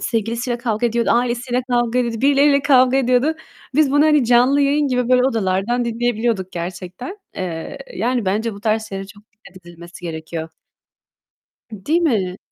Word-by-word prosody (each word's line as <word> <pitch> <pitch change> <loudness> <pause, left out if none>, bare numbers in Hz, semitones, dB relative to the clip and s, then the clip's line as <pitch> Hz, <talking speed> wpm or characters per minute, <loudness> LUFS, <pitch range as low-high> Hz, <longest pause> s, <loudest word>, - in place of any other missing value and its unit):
sevgilisiyle 235 +1 -2
kavga 235 -1 -1
ediyordu, 235 0 0
ailesiyle 245 +1 0
kavga 240 0 +1
ediyordu, 235 -2 -1
birileriyle 280 0 +4
kavga 260 -2 +4
ediyordu. 260 +4 +2 0.4
Biz 300 -2 +3
bunu 290 +1 +4
hani 300 -4 +4
canlı 250 +4 +4
yayın 285 +1 +2
gibi 250 -1 0
böyle 250 0 +4
odalardan 225 0 0
dinleyebiliyorduk 230 -4 -1
gerçekten. 180 - -6 0.2
Eee, 165 -3 -5 0.2
yani 245 -2 -1
bence 215 +3 -1
bu 200 - -11
tarz 220 0 -1
şeylere 195 0 -6
çok 205 +1 -16
dikkat 190 -4 -17
edilmesi 170 +1 -12
gerekiyor. 160 0 -5 1.2
Im 200 -3 -10
değil 330 +4 +2
mi? 200 - 0
235 Hz, 155 wpm, -19 LUFS, 195-255 Hz, 1.2 s, birileriyle